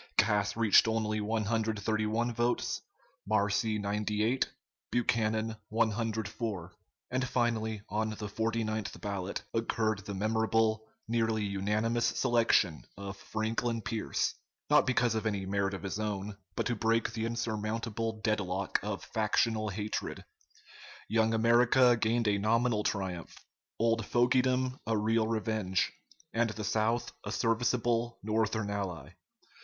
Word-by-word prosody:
Cass 105 -1 +3
reached 115 -1 +6
only 110 -1 0
131 110 +1 0
votes; 120 +1 0 0.5
Marcy, 105 +1 +2
98; 105 +4 0 0.4
Buchanan, 110 -2 +1
104; 110 -4 -1 0.4
and 130 0 0
finally, 110 -3 0
on 110 +1 -1
the 110 0 -5
49th 110 0 -2
ballot, 100 -2 -3
occurred 110 -2 0
the 100 0 -6
memorable 110 +1 +1 0.2
nearly 110 -1 +1
unanimous 105 +4 0
selection 115 -9 +2
of 100 0 -6
Franklin 115 +2 -2
Pierce 115 -3 -1 0.4
not - - +6
because 120 -2 +2
of 110 0 -1
any 100 -3 -1
merit 100 0 0
of 95 - -8
his 100 +2 -3
own, 105 -1 -3 0.2
but - - -1
to 120 - 0
break 115 +1 +1
the 115 -1 -1
insurmountable 115 -1 -2
dead 110 -1 +2
lock 95 0 -1
of 100 0 -4
factional 110 0 +1
hatred. 105 +2 -4 0.8
Young 110 0 +3
America 120 +2 +5
gained 115 0 +1
a 100 -1 +2
nominal 115 +1 +2
triumph, 95 -5 -3 0.4
old 115 0 +2
fogydom 125 +1 +2
a 115 -1 +2
real 110 +1 +2
revenge, 110 -4 0 0.4
and 115 0 +2
the 110 0 -5
South 110 +3 0
a - - -4
serviceable 120 0 +1
Northern 110 -1 0
ally. 90 -8 -4
110 Hz, 120 wpm, -31 LUFS, 105-115 Hz, 0.8 s, reached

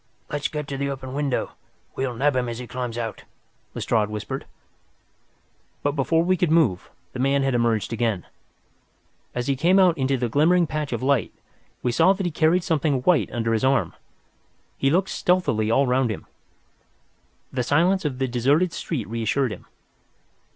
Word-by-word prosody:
"Let 145 - -2
us - - +1
get 150 -2 -5
to 135 - -3
the 140 0 -1
open 130 -1 -6
window. 140 -2 -1 0.4
We 135 - -1
will 125 - -5
nab 140 +3 +1
him 125 -1 0
as 115 - -5
he 125 - -6
climbs 125 -1 -5
out," 115 -3 -4 0.5
Lestrade 105 -2 0
whispered. 110 +6 -5 1.4
But 145 - +2
before 155 +4 +1
we 185 +2 +2
could 175 -1 +1
move, 150 - +2 0.2
the 130 - -6
man 135 +1 +2
had 135 -1 +1
emerged 115 -3 +1
again. 110 -5 -1 1.1
As 125 0 -2
he 140 - +1
came 170 +8 +3
out 185 -3 +5
into 135 0 +1
the 120 -1 -1
glimmering 165 +8 +3
patch 155 -2 -3
of - - -3
light, 135 -7 +1 0.5
we 125 - +1
saw 165 +10 +4
that 195 -1 -4
he 175 - -1
carried 165 +3 +2
something 150 -5 +1
white 180 0 +3
under 115 -1 -1
his 110 - 0
arm. 135 0 +2 0.8
He 135 - +1
looked 180 +6 +2
stealthily 150 -12 +1
all 135 +5 +3
round 125 -1 +1
him. 110 - -5 1.3
The 130 - 0
silence 170 +9 +2
of 145 -5 -2
the 135 0 0
deserted 140 +9 +2
street 130 -11 -4
reassured 115 +3 0
him. 100 - -9
135 Hz, 180 wpm, -24 LUFS, 120-155 Hz, 1.4 s, out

